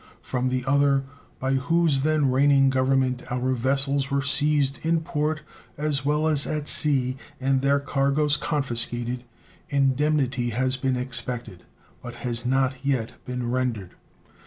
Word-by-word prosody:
From 130 0 -1
the 130 -1 -2
other, 140 0 +3 0.4
by 130 +1 0
whose 140 +1 +2
then 150 -2 +2
reigning 135 0 +4
Government 130 -1 +1
our 125 +1 0
vessels 135 +2 0
were 140 0 0
seized 145 -1 +1
in 165 0 +1
port 155 0 -2 0.3
as 145 -2 -1
well 150 +2 +1
as 150 -2 +2
at 150 -1 -3
sea 135 -4 +3 0.2
and 135 0 +1
their 140 +1 +2
cargoes 140 +2 +1
confiscated, 120 -4 -2 0.5
indemnity 135 -2 +1
has 130 +3 0
been 130 0 -1
expected, 125 -6 -5 0.4
but 120 -1 -8
has 120 0 -1
not 130 0 0
yet 130 -5 -2
been 125 -1 -3
rendered. 120 -8 -2
135 Hz, 135 wpm, -25 LUFS, 125-145 Hz, 0.5 s, reigning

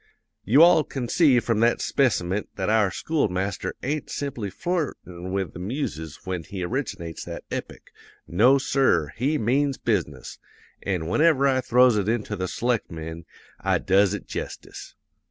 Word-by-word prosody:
"'You 135 - +6
all 170 -2 +6
can 130 -5 -5
see 140 -3 +4
from 115 -2 -1
that 115 +1 +3
speciment 105 -7 0
that 95 +3 -1
our 110 -3 +3
school 155 - -1
master 95 +2 -3
ain't 145 +2 -2
simply 125 -8 -4
flirtin' 95 - -4
with 95 -2 -2
the - - -9
muses 90 - -4
when 90 -2 -3
he 95 +2 -6
originates 100 - -4
that - - -7
epic; - - -6 0.4
no, 120 +10 +5
sir, 130 - +1
he 140 +6 0
means 135 +4 +1
business; 85 - -2 0.4
an' 90 -5 -2
whenever 140 - +3
I 130 -1 +2
throws 125 -2 +4
it 100 0 0
into 110 -2 -1
the 95 -1 -3
selectmen, 85 -9 -3 0.3
I - - +1
does 100 +1 +3
it 100 - -9
jestice. - - -7
110 Hz, 155 wpm, -24 LUFS, 90-135 Hz, 0.4 s, You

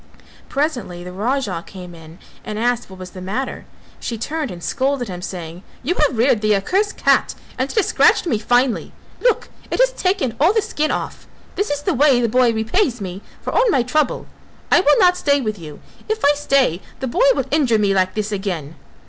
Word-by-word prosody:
Presently 250 - -2
the 180 - -8
Raja 205 -3 -2
came 180 -2 -10
in 165 0 -13 0.3
and 210 - -5
asked 240 0 0
what 190 - -11
was 185 -1 -9
the 185 - -9
matter; 215 +9 -4 0.3
she 230 - -4
turned 300 +5 -3
and 175 -3 -9
scolded 270 -2 -1
him 180 -1 -6
saying: 175 -2 -7 0.2
"You 310 +8 +1
have 295 -8 +1
reared 235 -2 +3
the 215 -1 +3
accursed 385 - 0
cat - - +2 0.2
and 260 +2 -2
it - - -7
has 430 - +3
scratched - - +4
me 235 -11 0
finely; 245 +2 +1 0.3
look, - - +1 0.2
it - - -1
has - - +5
taken 370 - -1
all 330 +8 +4
the 440 - +2
skin 310 -4 -1
off; - - -4 0.3
this 405 - -1
is 290 0 -2
the 375 - +1
way 275 -2 +4
the 240 - +2
boy 245 +1 +3
repays 230 - 0
me 190 -1 -6 0.2
for - - -3
all - - +3
my 265 - +3
trouble. 270 +2 0 0.5
I - - +7
will 295 -5 +4
not 360 -4 +5
stay 285 -4 +2
with 215 -6 -3
you; 150 -3 -10 0.3
if 440 0 0
I 290 - +6
stay 275 - +1 0.2
the 265 - -3
boy 260 - -1
will - - -1
injure 260 -8 +3
me 205 -2 +2
like 185 -1 +1
this 215 0 -2
again." 180 -7 -4
245 Hz, 210 wpm, -20 LUFS, 195-295 Hz, 0.5 s, I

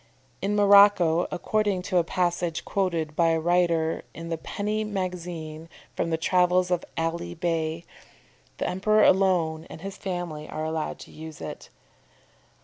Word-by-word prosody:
In 200 +2 0
Morocco, 200 -5 +6
according 205 -1 0
to 185 0 0
a - - +2
passage 175 -1 -1
quoted 170 -6 -1
by 170 +1 +3
a 165 0 +2
writer 170 -1 +1
in 165 0 -7
the 165 - -2
Penny 210 +5 -2
Magazine 175 -5 -5 0.3
from 170 - -1
the 160 - 0
Travels 180 +2 +2
of 180 - +1
Ali 170 +1 -2
Bey, 165 -1 -2 0.7
the - - -2
emperor 215 +4 +3
alone 175 -4 +3
and - - -10
his 195 +1 -7
family 175 -5 -5
are 155 - -4
allowed 160 -1 -3
to - - -12
use 160 -1 -10
it. - - -8
175 Hz, 145 wpm, -26 LUFS, 160-190 Hz, 0.7 s, Morocco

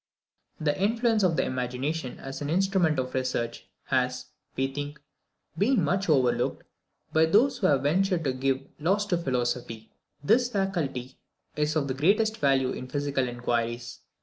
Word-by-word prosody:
The 150 -2 +1
influence 225 +1 +2
of 180 -4 +3
the - - +3
imagination 130 +3 -3
as 135 +2 -7
an 145 - -3
instrument 185 -2 +2
of 130 -1 -2
research, 130 -2 -2 0.2
has, 130 -1 0 0.3
we 135 - +1
think, 145 +1 -5 0.6
been 215 -1 +2
much 190 +5 0
overlooked 130 -5 +2 0.5
by 160 0 +4
those 230 +11 +3
who 190 - +3
have 140 -2 +2
ventured 180 +3 +2
to 135 -3 0
give 135 +1 -1
laws 195 +7 +1
to 180 -4 +1
philosophy. 120 -5 -2 0.3
This 245 - +3
faculty 165 - -2 0.4
is 150 +1 0
of 145 -3 +1
the 130 - -1
greatest 210 - +2
value 135 -2 +2
in 130 - -6
physical 140 -1 -1
inquiries. 120 -1 -2
145 Hz, 150 wpm, -27 LUFS, 130-190 Hz, 0.6 s, by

